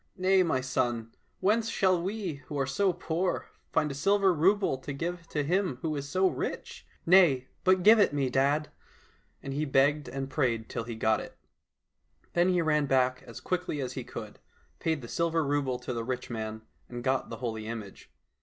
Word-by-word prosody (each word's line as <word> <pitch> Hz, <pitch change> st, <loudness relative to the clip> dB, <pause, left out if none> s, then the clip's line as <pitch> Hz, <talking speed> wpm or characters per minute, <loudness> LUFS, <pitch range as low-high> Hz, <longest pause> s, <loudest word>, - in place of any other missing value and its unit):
— -, -, -46 dB
" -, -, -37 dB
Nay, 190 Hz, 0 st, +6 dB
my 160 Hz, -7 st, +1 dB
son, 120 Hz, -3 st, -1 dB, 0.3 s
whence 220 Hz, +3 st, +2 dB
shall 185 Hz, -5 st, +2 dB
we 185 Hz, -6 st, -4 dB
who 145 Hz, -, -5 dB
are 135 Hz, -, +1 dB
poor 175 Hz, +3 st, -1 dB, 0.2 s
find 150 Hz, -, +1 dB
a -, -, -4 dB
silver 195 Hz, +6 st, +3 dB
rouble 180 Hz, -3 st, +2 dB
to 140 Hz, +2 st, -6 dB
give 170 Hz, +3 st, -4 dB
to 150 Hz, -2 st, -1 dB
him 180 Hz, -2 st, 0 dB
who 155 Hz, -2 st, -1 dB
is 140 Hz, 0 st, -5 dB
so 185 Hz, +5 st, +3 dB
rich? 385 Hz, -, -5 dB
" -, -, -31 dB
— -, -, -43 dB
'' -, -, -38 dB
Nay, 135 Hz, -9 st, +5 dB
but 185 Hz, -1 st, +4 dB
give 220 Hz, +3 st, +8 dB
it 205 Hz, -, +4 dB
me, 140 Hz, -2 st, 0 dB
dad! 140 Hz, +4 st, +1 dB, 0.3 s
" -, -, -36 dB
and 135 Hz, -, -4 dB
he 145 Hz, +2 st, -1 dB
begged 145 Hz, 0 st, +2 dB
and 135 Hz, +1 st, -4 dB
prayed 120 Hz, -6 st, -1 dB
till 115 Hz, -, -4 dB
he 120 Hz, -1 st, -5 dB
got 110 Hz, 0 st, +2 dB
it. -, -, -9 dB, 1.0 s
Then 175 Hz, +1 st, +3 dB
he 180 Hz, -2 st, +2 dB
ran 150 Hz, -2 st, +2 dB
back 130 Hz, -1 st, +2 dB
as 115 Hz, -, -9 dB
quickly 180 Hz, -4 st, -2 dB
as 130 Hz, -2 st, -3 dB
he -, -, -5 dB
could, -, -, -8 dB, 0.4 s
paid 160 Hz, -5 st, -1 dB
the -, -, -7 dB
silver 165 Hz, +2 st, 0 dB
rouble 140 Hz, -3 st, 0 dB
to 125 Hz, -, -5 dB
the 115 Hz, -1 st, -3 dB
rich 125 Hz, +1 st, -4 dB
man, 110 Hz, -1 st, -5 dB, 0.3 s
and 120 Hz, -1 st, -6 dB
got 130 Hz, 0 st, 0 dB
the 115 Hz, -, -6 dB
holy 110 Hz, -2 st, -4 dB
image. 110 Hz, -4 st, -8 dB
145 Hz, 210 wpm, -29 LUFS, 130-180 Hz, 1.0 s, give